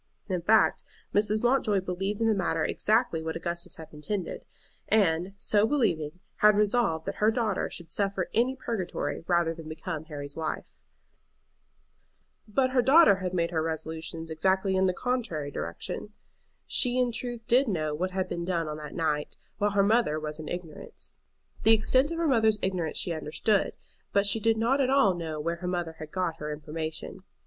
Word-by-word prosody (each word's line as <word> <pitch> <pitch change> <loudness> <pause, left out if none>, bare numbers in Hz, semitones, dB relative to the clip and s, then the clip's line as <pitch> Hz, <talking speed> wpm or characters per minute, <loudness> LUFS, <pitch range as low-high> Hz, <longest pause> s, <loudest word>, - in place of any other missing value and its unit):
In 185 -4 -1
fact, 215 +5 +3 0.3
Mrs. 210 +1 +2
Mountjoy 240 -5 +3
believed 195 +4 -3
in 225 - +3
the 220 - +4
matter 190 -4 0
exactly 220 -6 +1
what 160 0 -4
Augustus 170 +1 -4
had 160 - -10
intended, 180 +5 -4 0.4
and, 185 -2 +2
so 210 +2 +3
believing, 180 - 0 0.2
had 210 -1 +5
resolved 210 -6 +1
that - - -4
her 215 - +5
daughter 220 -4 0
should 170 -2 -8
suffer 195 -2 -1
any 245 +4 +2
purgatory 185 - -3
rather 170 -2 +2
than 160 -1 -10
become 155 0 -5
Harry's 145 -2 -6
wife. 160 -1 -3 1.8
But 255 +5 +1
her 255 -1 +4
daughter 240 - +5
made 170 -2 0
her 160 -2 0
resolutions 160 0 -4
exactly 190 +4 +1
in 190 0 +3
the 185 - +1
contrary 220 - -2
direction. 110 - -5 0.5
She 250 -1 +3
in 250 -1 +2
truth 240 0 -5
did 255 +3 +4
know 155 -7 -1
what 180 +5 -1
had 185 0 -2
been 170 - -4
done 170 -2 -1
on 150 0 -4
that 150 -1 -8
night, 150 -3 -1 0.2
while 205 0 +2
her 200 -1 +3
mother 205 -7 +2
was 150 0 -5
in 155 - -7
ignorance. 175 -3 -8 0.5
The 225 - +6
extent 255 +6 +3
of 335 - -4
her 335 -1 +1
mother's 220 -5 +3
ignorance 180 -5 -1
she 175 - -1
understood, 160 +7 0 0.4
but 200 0 +3
she 205 +2 +3
did 225 +1 +2
not 250 +5 +2
at 260 - +2
all 265 -8 +4
know 160 -3 -4
where 170 +3 -2
her 180 +1 -5
mother 175 -3 -3
had 155 - -7
got 180 -2 -2
her 150 -1 -5
information. 155 +3 -5
185 Hz, 175 wpm, -28 LUFS, 160-220 Hz, 1.8 s, The